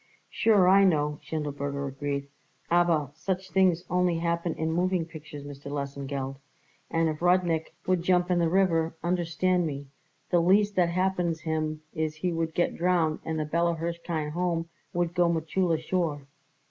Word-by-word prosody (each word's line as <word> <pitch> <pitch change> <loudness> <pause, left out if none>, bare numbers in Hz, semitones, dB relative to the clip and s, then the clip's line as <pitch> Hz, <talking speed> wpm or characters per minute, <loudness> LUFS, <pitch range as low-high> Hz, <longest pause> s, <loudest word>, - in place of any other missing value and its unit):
"Sure, 205 -5 +4
I 195 +2 +7
know," 150 -5 +2
Schindelberger 145 -2 -3
agreed, 140 +1 -3 0.4
"aber 170 -5 +3
such 185 +4 -3
things 180 -1 +3
only 180 -1 +1
happen 170 0 -1
in 160 0 -1
moving 180 0 +1
pictures, 155 -3 -10
Mr. 140 0 -9
Lesengeld, 140 -1 -4 0.5
and 165 0 +1
if 155 0 -3
Rudnik 175 -2 +2
would 185 -2 +2
jump 180 0 +2
in 175 - +3
the 165 -1 +2
river, 165 -3 +2
understand 175 0 +1
me, 140 -1 -5 0.5
the 175 - +5
least 200 +4 +3
that 175 -2 +3
happens 175 -2 0
him 155 -1 -2
is 155 -1 -2
he 175 +2 -2
would 165 -1 -2
get 175 - +1
drownded 170 -3 +1
and 160 -1 -1
the 155 - -1
Bella 170 +2 +1
Hirshkind 165 -2 -3
Home 170 0 -1 0.2
would 175 -1 -1
go 175 -1 +3
Mechulla 165 +1 0
sure." 160 -4 -1
165 Hz, 160 wpm, -27 LUFS, 155-180 Hz, 0.5 s, I